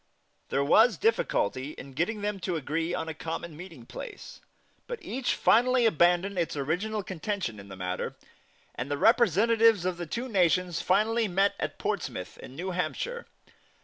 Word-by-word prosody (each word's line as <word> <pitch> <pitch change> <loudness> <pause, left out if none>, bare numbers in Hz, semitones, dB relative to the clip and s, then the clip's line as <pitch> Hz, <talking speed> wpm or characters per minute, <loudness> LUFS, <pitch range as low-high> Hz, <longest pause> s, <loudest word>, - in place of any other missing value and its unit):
There 140 - +1
was 220 +11 +5
difficulty 410 - 0
in 135 0 -10
getting 180 - -1
them 205 -1 -2
to 175 -1 -2
agree 160 +3 -2
on 160 - -3
a 160 - -3
common 165 +1 -5
meeting 165 -7 -10
place; 420 - -9 0.5
but 485 - -4
each 255 -3 -1
finally 245 +1 +4
abandoned 180 0 +3
its 165 -3 -1
original 190 +10 -1
contention 185 - -3
in 100 - -11
the 95 - -9
matter, 90 0 -3 0.6
and 125 +3 -5
the 145 - -1
representatives 225 0 +4
of 185 -1 -1
the 175 -1 -5
two 240 +9 -3
nations 180 -4 +2
finally 220 +4 +2
met 195 +2 +2
at - - -3
Portsmouth, - - -4
in 130 - -10
New 185 +5 -4
Hampshire. 185 - -3
180 Hz, 160 wpm, -28 LUFS, 160-220 Hz, 0.6 s, was